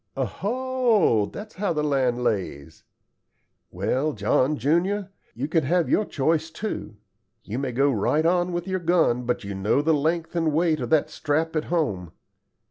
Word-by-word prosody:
"Oho, 215 - +1
that's 210 - -9
how 195 -2 -1
the 150 -1 -1
land 130 -4 +1
lays. 85 -9 -3 0.9
Well, 145 +4 -1
John 130 +7 +1
junior, 180 - 0 0.2
you 130 +4 -3
can 160 0 +1
have 175 +4 +1
your 215 - +3
choice, 160 +2 0
too. 160 - -5 0.5
You 115 +5 -4
may 135 -2 -2
go 135 +4 +2
right 145 +7 +1
on 175 +1 +2
with 175 +1 -3
your 190 0 -1
gun, 165 -8 +2
but 125 - -1
you 100 0 -5
know 100 +9 +1
the 160 +1 +3
length 160 +3 -1
and 165 -2 +1
weight 160 0 +2
of - - -4
that 155 -2 +2
strap 155 +2 -1
at 155 - 0
home. 100 - -2
155 Hz, 165 wpm, -24 LUFS, 125-175 Hz, 0.9 s, your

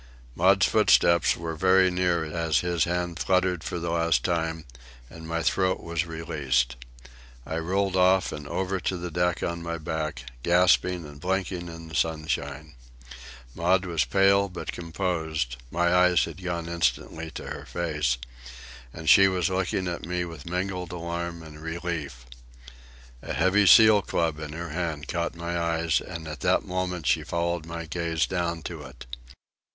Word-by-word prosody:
Maud's 95 +6 +4
footsteps 95 -5 +4
were 85 0 -4
very 95 +2 +4
near 90 -2 +1
as 80 0 0
his 85 -3 +1
hand 85 -1 -2
fluttered 90 -3 +1
for - - -4
the 85 0 -3
last 85 0 +2
time 80 -2 -1 0.5
and 80 0 -10
my 85 0 -2
throat 95 +4 +1
was 85 0 -3
released. 70 -6 -1 0.7
I 80 - -3
rolled 95 +3 0
off 95 0 +4
and 75 -1 -7
over 95 +3 -2
to 95 - -2
the 90 0 -5
deck 90 +1 0
on 85 0 -2
my 85 0 -4
back, 80 -5 -4 0.2
gasping 90 +1 +3
and 75 -1 -12
blinking 90 -1 -2
in 80 -1 -9
the 80 - -12
sunshine. 75 -2 -2 0.8
Maud 90 +3 +2
was 85 -3 +1
pale 100 0 +3
but 90 - -5
composed,—my 80 -3 -2
eyes 90 -1 +5
had 85 +2 -9
gone 85 -2 -3
instantly 80 0 -1
to - - -6
her - - -7
face,—and 60 -2 -5
she 95 +4 +8
was 95 -1 0
looking 95 0 -1
at 85 -1 -4
me 90 0 -1
with 85 -2 -9
mingled 90 0 -3
alarm 85 -1 -4
and 75 -1 -11
relief. 80 -6 -5 1.0
A - - -5
heavy 95 +3 +3
seal 110 +1 +8
club 80 -5 -1
in 75 -1 -6
her 85 +2 -5
hand 80 -2 -3
caught 85 -1 -2
my 85 +1 -3
eyes, 85 -2 +1
and 80 -1 -7
at 75 -3 -6
that - - +2
moment 90 -3 -3
she - - +2
followed 85 -1 -2
my 85 0 -5
gaze 80 0 -1
down 85 -3 -2
to 85 -3 -6
it. 65 -3 -11
85 Hz, 155 wpm, -26 LUFS, 80-90 Hz, 1.0 s, she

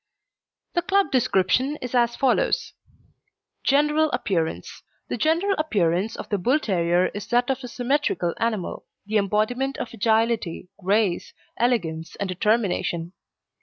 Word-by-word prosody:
The 345 - +2
club 390 -2 +1
description 255 +3 +2
is 250 -1 -6
as 235 -1 +2
follows: 275 - +1 0.9
GENERAL 300 +3 +3
APPEARANCE 160 - -2 0.3
The - - -2
general 330 - +2
appearance 200 - +1
of - - -7
the 205 - 0
Bull 250 +11 +3
terrier 175 - +1
is 205 -1 -6
that 245 +2 +2
of 265 0 -3
a - - -5
symmetrical 245 - 0
animal, 225 -5 -2 0.2
the 215 +1 0
embodiment 215 +7 0
of - - -5
agility, 220 -5 0
grace, 200 -1 +1 0.2
elegance, 170 -10 -1
and 200 - -3
determination. 185 -3 0
225 Hz, 130 wpm, -24 LUFS, 185-265 Hz, 0.9 s, GENERAL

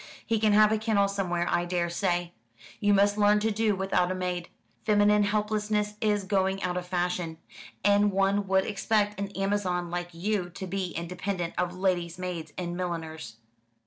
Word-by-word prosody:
He 225 -1 +1
can 215 -1 +3
have 215 0 +6
a 220 - +1
kennel 215 -2 +2
somewhere, 180 -3 -1
I 175 - +1
daresay. 175 0 -1 0.5
You 205 - +2
must 205 +1 +3
learn 210 0 +5
to 220 +1 +1
do 215 -1 +1
without 190 -2 +1
a - - -1
maid. 180 -1 -3 0.3
Feminine 210 -1 +4
helplessness 210 0 0
is 210 -2 +1
going 190 0 0
out 180 -1 -1
of 180 0 -4
fashion; 175 -2 -2 0.5
and 205 0 +4
one 195 +1 +1
would 190 0 +3
expect 210 0 0
an 200 0 -2
Amazon 195 -3 -1
like 175 0 -3
you 180 +1 -2
to 190 - -5
be 190 +1 -2
independent 180 +1 -3
of 180 0 -2
lady's 180 -2 0
maids 175 -4 -5
and 175 -1 -3
milliners." 160 -8 -5
190 Hz, 170 wpm, -28 LUFS, 175-205 Hz, 0.5 s, have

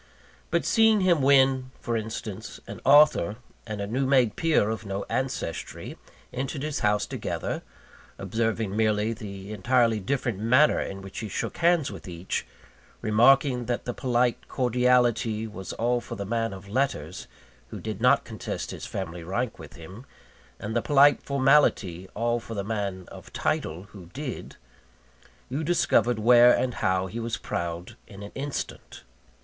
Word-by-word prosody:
But - - 0
seeing 220 -2 +4
him 175 -5 +3
when, 135 -1 +4
for 120 - -2
instance, 110 -2 -5
an - - -9
author 140 - +5 0.3
and 105 -2 -5
a 100 - -2
new 130 +6 -1
made 130 -5 +3
peer 155 -10 +2
of 110 - -4
no 100 -1 -4
ancestry 130 -10 -4 0.4
entered 135 +2 -3
his 150 -1 -2
house 105 0 +1
together - - -4 0.6
observing 110 +1 -2
merely 110 0 +1
the 100 -1 -8
entirely 115 +1 +2
different 120 0 -2
manner 125 +8 +4
in 95 0 -5
which 95 - -8
he 110 - -5
shook - - -4
hands 170 -3 +2
with - - -10
each 90 +1 -4 0.5
remarking 125 +3 +4
that 120 0 -2
the 120 - -3
polite 120 -1 0
cordiality 120 -3 +2
was 105 -4 -7
all 120 +1 0
for - - -7
the 100 - -5
man 115 +2 -1
of 95 0 -10
letters, 100 - -2 0.4
who - - -8
did 110 -1 -6
not 125 - +4
contest 110 -4 -5
his - - -7
family 85 -3 -5
rank 105 +6 -3
with 80 -3 -11
him, 95 +11 -12 0.5
and 110 +2 -5
the 120 - +2
polite 145 +1 +5
formality 130 - +2
all 120 +2 0
for 115 0 -8
the 100 - -2
man 100 -3 -3
of - - -12
title, 80 +4 -2
who 95 -5 -12
did 130 - -7 0.9
you 140 +5 -3
discovered 125 -8 +2
where 120 +2 +7
and 125 0 +1
how 95 0 +1
he 110 +5 -6
was 115 0 -3
proud 85 +5 -4
in 100 -1 -11
an 100 - -9
instant. 140 +1 -6
115 Hz, 155 wpm, -26 LUFS, 100-130 Hz, 0.9 s, where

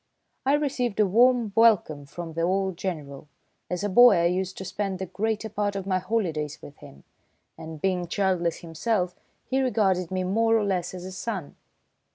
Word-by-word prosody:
I 275 - +4
received 260 -7 -1
a 210 - +5
warm 235 +2 +3
welcome 195 -10 +3
from 165 +2 -7
the 165 - -2
old 190 +2 0
General. 150 -6 -5 0.4
As 180 +1 -3
a - - +1
boy 245 +5 +7
I 170 - +2
used 185 +2 -1
to 190 - -6
spend 195 0 -3
the 190 - -4
greater 215 +4 -2
part 205 -1 -2
of 195 -1 -4
my 185 -1 +1
holidays 165 -9 -2
with 145 - -13
him, 70 - -14 0.5
and 160 -1 -9
being 180 0 -1
childless 180 -3 0
himself, 180 +2 -1 0.3
he 265 +1 0
regarded 195 -8 +1
me 185 0 -2
more 225 +4 +2
or 215 - +1
less 185 -3 -1
as 180 0 -7
a 190 - -7
son. 185 -4 -5
190 Hz, 185 wpm, -26 LUFS, 175-215 Hz, 0.5 s, boy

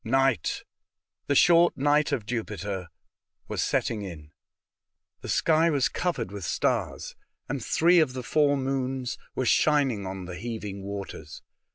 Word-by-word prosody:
I^ight 135 -5 +1 0.3
— - - -58
the 140 - +1
short 170 +3 +5
night 145 +2 +2
of 110 - -1
Jupiter 105 -5 -4 0.3
— - - -51
was - - -2
setting 110 -3 0
in. 80 -6 -8 0.9
The - - -7
sky 165 +1 +3
was 140 -5 +2
covered 130 - -2
with 100 -2 -7
stars, 75 - -1 0.3
and 135 -2 -3
three 175 +7 +4
of 150 -5 +2
the 130 -1 -5
four 145 +2 +2
moons 130 -1 -2 0.2
were 130 - -1
shining 135 -8 +2
on 95 -1 -6
the 90 -1 -7
heaving 105 -2 -5
waters. 95 -6 -7
125 Hz, 150 wpm, -27 LUFS, 100-145 Hz, 0.9 s, short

